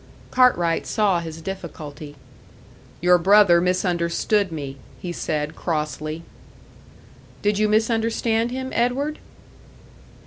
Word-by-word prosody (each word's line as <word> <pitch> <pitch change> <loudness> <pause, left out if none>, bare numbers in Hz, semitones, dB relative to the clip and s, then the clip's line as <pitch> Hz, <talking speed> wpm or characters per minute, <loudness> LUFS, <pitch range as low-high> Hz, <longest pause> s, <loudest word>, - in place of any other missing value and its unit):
Cartwright 175 -10 +3
saw 205 -5 +2
his 165 -1 -7
difficulty. 155 -5 -7 0.9
"Your 180 0 +5
brother 190 -1 +6
misunderstood 180 +2 +1
me," 140 -4 -6 0.2
he 175 - -5
said, 150 -2 -3
crossly. 155 0 -3 1.2
"Did 205 0 +1
you 215 0 +2
misunderstand 225 +1 +1
him, 260 +1 -4
Edward?" 265 +6 0
180 Hz, 95 wpm, -23 LUFS, 165-220 Hz, 1.2 s, brother